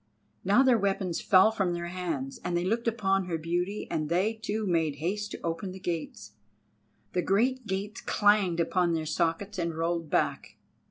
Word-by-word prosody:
Now 205 +8 +5
their 255 -4 +4
weapons 195 -3 -1
fell 190 +3 +6
from 195 -5 0
their 170 0 -4
hands, 165 -7 -4
and 175 - -1
they 175 - 0
looked 230 +5 0
upon 195 -4 +1
her 170 -2 -2
beauty, 175 +5 -2
and 155 -1 -1
they 185 +6 +2
too 220 -1 -3
made 165 -5 +1
haste 200 +8 -2
to - - -7
open 170 +3 -3
the 190 - -9
gates. 165 - -5 0.8
The 180 - +1
great 235 +6 +1
gates 195 +2 -3
clanged 205 -5 +3
upon 175 0 +1
their 160 -1 -1
sockets 170 +5 -1
and 170 -1 -2
rolled 165 -1 -1
back. - - -1
185 Hz, 175 wpm, -28 LUFS, 170-205 Hz, 0.8 s, fell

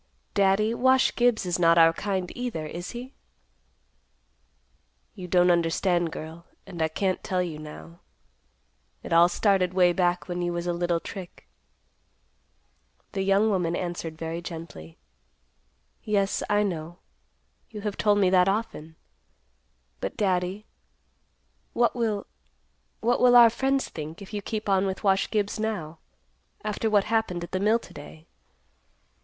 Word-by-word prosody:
Daddy, 200 +2 +2
Wash 260 +2 +3
Gibbs 240 -5 +2
is 180 0 -1
not 170 -1 +5
our 165 0 +6
kind 190 -1 -3
either, 245 -11 -4
is 175 +3 -6
he?" 250 +3 -8 2.0
"You 180 - -8
don't 180 0 +4
understand, 170 0 +1
girl, 160 +2 -9 0.2
and 175 -4 -7
I 160 - +3
can't 185 +4 -2
tell 185 -1 0
you 160 -4 -6
now. 155 +2 -11 1.0
It - - -4
all 170 +1 +6
started 185 -1 +1
way 180 -2 +4
back 175 -1 0
when 175 -1 -3
you 175 0 -1
was 170 0 -3
a 175 - 0
little 170 0 0
trick." 180 +1 -10 1.6
The 195 - -2
young 195 +3 +3
woman 175 -3 0
answered 170 -3 -4
very 165 +1 -4
gently, 160 - -9 1.1
"Yes, 200 -2 0
I 205 0 +3
know. 170 -3 -4 0.7
You 215 -3 -8
have 205 -1 -3
told 205 -1 +2
me 190 -3 +3
that 185 0 +4
often. 195 -7 -3 1.0
But, - - -5
Daddy, 190 +1 -1 1.1
what 240 +1 +2
will—what 230 +1 -4
will 245 -1 +6
our 235 -2 +9
friends 270 +3 0
think, 155 +1 -8
if 200 +1 -11
you 205 - -3
keep 215 +1 -5
on 195 0 +2
with 190 0 -4
Wash 195 -1 +2
Gibbs 210 0 -1
now, 175 -8 -4 0.6
after 215 +1 -1
what 205 -2 +3
happened 215 -6 -1
at 175 - -8
the 185 - -1
mill 215 +3 +3
to - - -14
day? 155 +2 -12
185 Hz, 145 wpm, -26 LUFS, 170-210 Hz, 2.0 s, our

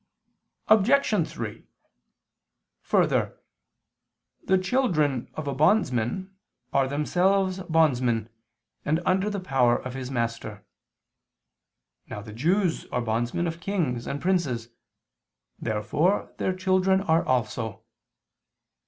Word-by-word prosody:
Obj. 215 - +3
3: 110 -3 -6 1.2
Further, - - +1 1.1
the 190 - +4
children 180 - 0
of 155 -2 -5
a 140 - -1
bondsman 155 - +1 0.4
are 135 -1 +3
themselves 185 +6 +1
bondsmen, 125 -8 +2 0.6
and 155 +2 +1
under 190 +3 +2
the 205 -1 -3
power 130 -9 +2
of 130 - -7
his 130 -1 -5
master. 115 -4 -3 1.4
Now 105 - -6
the 105 -1 -10
Jews 170 - 0
are - - -2
bondsmen 120 +8 -1
of 165 0 -3
kings 165 -12 -2
and 140 - -3
princes: 145 -11 0 0.9
therefore 130 - 0
their 185 - -1
children 185 0 +2
are 165 -3 +2
also. 120 -3 -2
155 Hz, 100 wpm, -26 LUFS, 120-185 Hz, 1.4 s, the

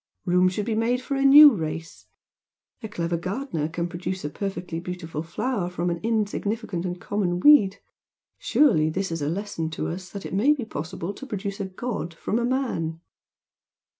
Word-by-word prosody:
Room 180 0 +4
should 200 +3 -3
be 225 - -1
made 230 +3 +1
for 265 - -5
a 275 0 +1
new 290 +2 +10
race! 160 - -5 0.7
A 220 - -5
clever 170 -2 -2
gardener 180 - -3
can 170 +1 -2
produce 180 0 -5
a 145 - -3
perfectly 180 -4 -4
beautiful 170 -3 -5
flower 180 +3 -2
from 175 0 -2
an 170 - -3
insignificant 215 -3 -1
and 180 0 -5
common 180 -3 -1
weed, 200 -6 +6 0.6
surely 255 - +3
this 190 +3 -2
is 165 -1 -3
a 145 - 0
lesson 170 -3 -3
to 160 - -3
us 180 +2 -6
that 200 +1 -8
it - - -6
may 235 +10 +4
be 255 -6 -5
possible 175 +1 -5
to 275 - -10
produce 200 -3 -4
a 200 - -2
god 190 -4 -5
from 215 +6 -1
a 235 - 0
man!" 235 -12 -1
185 Hz, 180 wpm, -25 LUFS, 170-220 Hz, 0.7 s, new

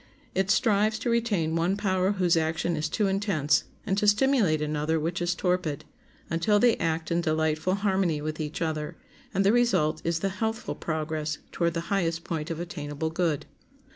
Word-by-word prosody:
It 190 0 0
strives 215 0 +3
to 235 +1 -1
retain 205 -9 +1
one 175 +4 +1
power 190 -1 +1
whose 180 -3 +2
action 165 +1 0
is 155 0 -2
too 210 - 0
intense, 190 -7 +1 0.2
and 195 -3 +1
to 210 - +1
stimulate 210 - +3
another 150 +1 0
which 165 +3 -2
is 175 0 0
torpid, 180 -5 -1 0.4
until 170 +6 +2
they 235 +2 +4
act 160 -1 -1
in 170 +1 +2
delightful 160 +2 +1
harmony 190 -6 +1
with 155 +1 -4
each 155 +2 -3
other, 155 -2 -3 0.4
and 195 +1 +1
the 200 - +5
result 235 -11 +2
is 165 -1 -1
the 195 - +1
healthful 220 +4 -3
progress 155 -1 -3
toward 170 -1 0
the 165 - -1
highest 165 -4 0
point 155 -2 -4
of 165 -1 -4
attainable 160 -2 -4
good. 165 -4 0
170 Hz, 175 wpm, -27 LUFS, 155-200 Hz, 0.4 s, the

